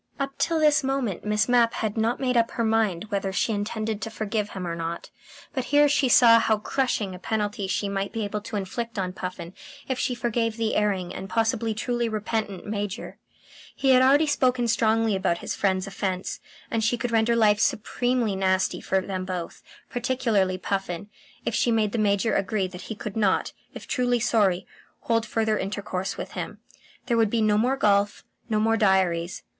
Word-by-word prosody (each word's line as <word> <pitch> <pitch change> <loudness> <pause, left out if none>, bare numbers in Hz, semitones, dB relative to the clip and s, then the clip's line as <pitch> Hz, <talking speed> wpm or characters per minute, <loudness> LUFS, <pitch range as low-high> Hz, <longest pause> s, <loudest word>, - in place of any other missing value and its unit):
Up 275 0 -3
till 330 -1 +1
this 300 -2 +4
moment 265 -9 -2
Miss 210 0 +1
Mapp 240 -2 +4
had 215 -2 -2
not 225 +2 0
made 255 -2 0
up 230 -1 +3
her 235 - -2
mind 220 -4 0
whether 195 -1 -1
she 200 - 0
intended 215 +1 -3
to - - -3
forgive 215 -1 -2
him 185 -2 -6
or 170 -1 -3
not; 165 0 -5 0.4
but 260 -3 -2
here 290 +2 +5
she 280 -2 +2
saw 230 -2 +7
how 220 -1 +2
crushing 210 -3 -1
a 180 - -9
penalty 205 0 -2
she 200 +1 -1
might 195 0 -2
be 225 -1 -3
able 205 +1 -3
to 215 - -7
inflict 225 +4 -4
on 185 -2 -2
Puffin 180 -2 -6 0.3
if 260 -1 -2
she 250 - 0
forgave 235 -1 -1
the 225 -1 0
erring 195 -4 0
and 195 - -7
possibly 225 0 0
truly 240 +1 -1
repentant 215 -2 -3
Major. 205 0 -4 0.6
He 270 - +2
had 255 0 +6
already 280 +4 +5
spoken 255 -4 +1
strongly 225 -1 +2
about 190 -3 0
his - - -4
friend's 190 -2 0
offence, 195 -2 -3 0.3
and 225 -1 0
she 230 +2 +2
could 240 0 -3
render 230 +1 +3
life 210 -2 +4
supremely 240 0 0
nasty 190 -1 +1
for 190 - +1
them 185 -1 -4
both 180 -2 -5 0.3
particularly 230 -7 0
Puffin 195 0 -3 0.3
if - - -1
she - - +2
made 220 -2 +2
the 230 - -2
Major 205 +1 +2
agree 195 0 0
that 180 0 -10
he 220 - -4
could 210 -1 -6
not, 205 -4 +1 0.2
if - - -8
truly 245 -1 +1
sorry, 205 -6 +2 0.4
hold 230 -1 0
further 220 -1 0
intercourse 195 -1 -3
with - - -6
him. - - -5 0.5
There 235 - +1
would 225 -2 +3
be 225 0 +1
no 210 -1 +3
more 250 +6 +2
golf, 205 -3 +2 0.3
no 215 -1 +1
more 225 +1 +2
diaries. 185 -4 +1
215 Hz, 190 wpm, -25 LUFS, 195-235 Hz, 0.6 s, saw